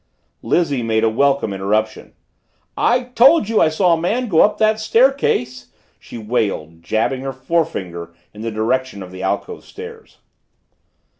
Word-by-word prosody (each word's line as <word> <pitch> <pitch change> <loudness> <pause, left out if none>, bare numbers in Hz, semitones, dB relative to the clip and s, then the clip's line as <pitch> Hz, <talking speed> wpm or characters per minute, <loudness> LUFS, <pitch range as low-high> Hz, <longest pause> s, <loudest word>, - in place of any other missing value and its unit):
Lizzie 145 -7 0
made 110 -1 0
a 115 - +4
welcome 140 -3 +1
interruption. 105 +3 -2 0.6
"I 250 +2 +2
told 250 +2 +4
you 225 -1 +2
I 160 - +4
saw 170 +2 +2
a 165 - -1
man 230 +7 -1
go 165 -4 +4
up 210 - +3
that 215 0 +2
staircase!" 220 - +1 0.3
she - - -11
wailed, 100 -8 -3
jabbing 110 +8 -1
her 135 0 -4
forefinger 130 - -3 0.2
in 105 - -11
the 115 - -3
direction 115 0 -2
of 90 - -11
the 95 0 -9
alcove 430 - -3
stairs. 455 0 -12
130 Hz, 150 wpm, -19 LUFS, -, 0.6 s, a